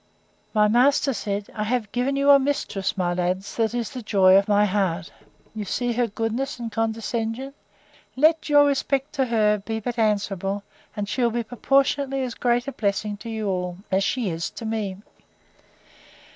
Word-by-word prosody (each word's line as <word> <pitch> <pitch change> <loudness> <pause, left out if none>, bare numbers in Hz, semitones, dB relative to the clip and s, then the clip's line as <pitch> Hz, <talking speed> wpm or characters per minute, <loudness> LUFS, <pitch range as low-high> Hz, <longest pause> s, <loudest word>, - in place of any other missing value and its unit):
My 210 -1 +4
master 265 +5 +3
said, 200 -1 -4
I 210 - -2
have 225 -2 -1
given 250 +3 0
you 280 +1 +4
a 280 - +8
mistress, 265 -9 -2
my 175 -2 0
lads, 180 +2 -2
that 225 0 +1
is 235 -2 -2
the 255 -3 -6
joy 190 -4 +5
of 195 +1 +4
my 205 0 +4
heart: 185 -4 -1 0.4
You 215 -1 -4
see 240 +5 -1
her 240 0 +1
goodness 225 +6 -3
and 235 -2 -5
condescension! 225 +3 -2 0.6
Let 315 +3 +3
your 290 0 +6
respects 275 0 0
to 265 - +3
her 215 -3 +2
be 220 +2 -4
but 235 +2 -4
answerable, 200 -2 0 0.3
and 205 -2 -3
she'll 240 +2 +1
be 235 +1 -2
proportionately 270 +3 +1
as 250 -2 -3
great 245 +2 0
a - - -2
blessing 205 -2 -1
to 230 - -9
you 220 -2 -3
all, 180 -2 -2
as 190 +1 +2
she 230 -3 -1
is 165 0 -3
to 230 - -9
me. 215 -4 -2
225 Hz, 175 wpm, -24 LUFS, 200-250 Hz, 0.6 s, a